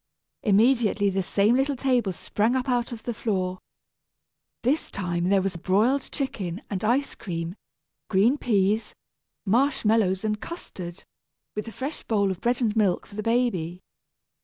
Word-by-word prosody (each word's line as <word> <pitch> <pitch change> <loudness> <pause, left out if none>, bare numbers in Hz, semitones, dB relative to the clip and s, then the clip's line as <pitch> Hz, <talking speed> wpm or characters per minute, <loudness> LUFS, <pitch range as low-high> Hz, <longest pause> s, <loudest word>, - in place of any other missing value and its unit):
Immediately 215 -2 +3
the 190 0 0
same 200 +4 +2
little 270 +2 +1
table 250 -6 +1
sprang 215 +6 0
up 260 +1 -1
out 245 -1 0
of 230 -2 -7
the 240 - -2
floor. 185 -4 -1 1.0
This 275 +6 +1
time 175 -2 -1
there 195 -1 +3
was 190 -3 -2
broiled 215 - +1
chicken 200 - -3
and 195 -1 -2
ice 250 +6 +1
cream, 170 -2 -4 0.6
green 220 +9 +3
peas, 215 -1 +1 0.5
marsh 265 +6 +2
mallows 210 -3 +2
and 210 -1 -1
custard, 180 - -8 0.5
with 210 +2 -4
a - - -5
fresh 270 +8 -5
bowl 200 -3 +1
of 185 - -6
bread 245 +2 +1
and 220 -3 +1
milk 200 -5 +2
for - - -17
the 215 - -3
baby. 210 -7 0
215 Hz, 155 wpm, -26 LUFS, 190-245 Hz, 1.0 s, Immediately